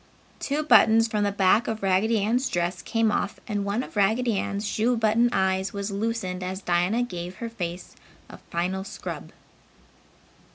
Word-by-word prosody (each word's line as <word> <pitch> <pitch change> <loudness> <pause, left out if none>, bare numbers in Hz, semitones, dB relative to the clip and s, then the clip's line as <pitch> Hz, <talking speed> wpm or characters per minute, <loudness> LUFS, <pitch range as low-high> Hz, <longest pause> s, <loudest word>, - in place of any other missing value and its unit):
Two 290 +2 -1
buttons 225 -6 +6
from 210 -2 -1
the 205 - +1
back 200 +4 +3
of 220 -2 -3
Raggedy's 220 +6 +2
dress 175 +1 -1
came 225 -1 +1
off 205 -1 -2
and 205 -3 -2
one 200 +5 -1
of - - -11
Raggedy 220 +3 +2
Ann's 200 +1 -3
shoe 235 +4 +1
button 225 +2 +3
eyes 190 -2 0
was 200 0 -4
loosened 200 -3 -2
as 185 +1 -5
Dinah 180 +7 +1
gave 180 -5 -6
her 230 +2 -5
face 180 -5 -6 0.3
a - - -12
final 185 +3 -2
scrub. - - -7
205 Hz, 160 wpm, -25 LUFS, 190-225 Hz, 0.3 s, buttons